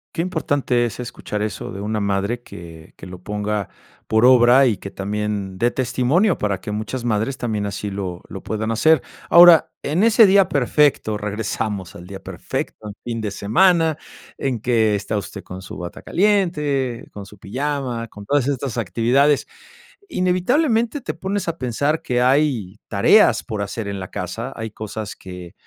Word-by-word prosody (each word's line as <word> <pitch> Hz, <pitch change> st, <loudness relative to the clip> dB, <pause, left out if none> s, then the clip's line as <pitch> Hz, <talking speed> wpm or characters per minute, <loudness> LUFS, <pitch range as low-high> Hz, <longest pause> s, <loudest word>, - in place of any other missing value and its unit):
Qué 165 Hz, -, 0 dB
importante 145 Hz, -8 st, 0 dB
es 115 Hz, -, -6 dB
escuchar 115 Hz, -3 st, -5 dB
eso 105 Hz, -2 st, -4 dB
de 100 Hz, -, -7 dB
una 105 Hz, +1 st, -2 dB
madre 100 Hz, +4 st, -1 dB
que 85 Hz, -6 st, -12 dB
que -, -, -11 dB
lo 90 Hz, 0 st, -10 dB
ponga 105 Hz, 0 st, -3 dB, 0.4 s
por 110 Hz, +2 st, +3 dB
obra, 125 Hz, +1 st, +7 dB
y 115 Hz, -5 st, +2 dB
que 100 Hz, -, -8 dB
también 100 Hz, -1 st, -3 dB
dé 120 Hz, +6 st, +2 dB
testimonio, 130 Hz, -, +1 dB
para 100 Hz, -2 st, -2 dB
que 105 Hz, -, -6 dB
muchas 110 Hz, +4 st, -4 dB
madres 115 Hz, +3 st, -1 dB
también 110 Hz, -4 st, -2 dB
así 100 Hz, 0 st, -4 dB
lo 95 Hz, -3 st, -5 dB
lo 95 Hz, -, -8 dB
puedan 110 Hz, +1 st, -2 dB
hacer. 155 Hz, +5 st, +4 dB, 0.3 s
Ahora, 175 Hz, -1 st, +8 dB
en 155 Hz, +7 st, +1 dB
ese 225 Hz, 0 st, +7 dB
día 195 Hz, -1 st, +5 dB
perfecto, 140 Hz, -4 st, +2 dB
regresamos 105 Hz, -2 st, -3 dB
al 85 Hz, +1 st, -11 dB
día 95 Hz, 0 st, -7 dB
perfecto, 105 Hz, -, -5 dB
un 105 Hz, -, -8 dB
fin 115 Hz, -1 st, -3 dB
de 105 Hz, -2 st, -3 dB
semana, 160 Hz, -, +3 dB, 0.4 s
en 130 Hz, -3 st, -2 dB
que 110 Hz, -3 st, +2 dB
está 100 Hz, +2 st, -3 dB
usted 100 Hz, 0 st, -6 dB
con 95 Hz, +1 st, -9 dB
su 95 Hz, -, -9 dB
bata 90 Hz, -1 st, -7 dB
caliente, 150 Hz, -, 0 dB
con 100 Hz, -1 st, -8 dB
su 105 Hz, +1 st, -15 dB
pijama, 125 Hz, +1 st, -3 dB
con 105 Hz, -1 st, -12 dB
todas 140 Hz, +1 st, +1 dB
estas 135 Hz, -3 st, -2 dB
actividades. 125 Hz, +7 st, +2 dB, 0.6 s
Inevitablemente 230 Hz, -, +1 dB
te -, -, -4 dB
pones 195 Hz, -1 st, -3 dB
a 170 Hz, 0 st, -3 dB
pensar 140 Hz, +5 st, 0 dB
que 125 Hz, 0 st, 0 dB
hay 125 Hz, -8 st, +1 dB
tareas -, -, +4 dB
por 105 Hz, -2 st, -4 dB
hacer 100 Hz, +1 st, -4 dB
en 100 Hz, -1 st, -4 dB
la 95 Hz, -, -7 dB
casa, 115 Hz, +9 st, -5 dB
hay 110 Hz, -1 st, -5 dB
cosas 110 Hz, 0 st, -6 dB
que 90 Hz, -1 st, -10 dB
115 Hz, 170 wpm, -21 LUFS, 100-145 Hz, 0.6 s, Ahora